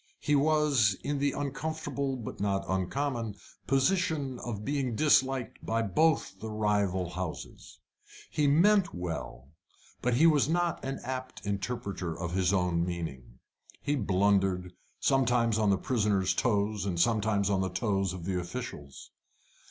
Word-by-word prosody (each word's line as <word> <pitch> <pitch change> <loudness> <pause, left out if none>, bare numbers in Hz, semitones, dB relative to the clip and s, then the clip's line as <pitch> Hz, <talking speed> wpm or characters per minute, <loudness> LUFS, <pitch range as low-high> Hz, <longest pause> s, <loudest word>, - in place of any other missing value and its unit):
He 150 - +1
was 140 -8 +3
in 145 0 -1
the 140 0 +1
uncomfortable 140 -1 -3
but 120 -4 -7
not 100 -1 0
uncommon 115 +4 -2 0.3
position 140 -2 +1
of 105 -3 -5
being 135 -5 -1
disliked 135 -3 +2
by 115 +1 0
both 115 - +1
the 110 - -6
rival 100 -4 0
houses. 90 -2 -7 0.5
He 150 -1 +2
meant 180 - +4
well, 80 -7 -5 0.5
but 125 -1 +1
he 155 +7 +5
was 150 -3 +4
not 175 0 0
an 135 +1 -3
apt 130 -3 -6
interpreter 100 -4 -3
of 85 0 -3
his 95 -1 +2
own 90 -3 +1
meaning. 80 -9 -5 0.4
He 145 0 -1
blundered, 95 -4 +1 0.3
sometimes 120 -4 +2
on 105 -2 +3
the 100 - +3
prisoners' 100 -4 +1
toes, 105 -2 0
and 90 -4 -2
sometimes 105 -1 +2
on 95 -1 +2
the 95 - -1
toes 100 -4 0
of 90 -2 -7
the 95 -1 -1
officials. 90 - -7
110 Hz, 140 wpm, -29 LUFS, 95-135 Hz, 0.5 s, he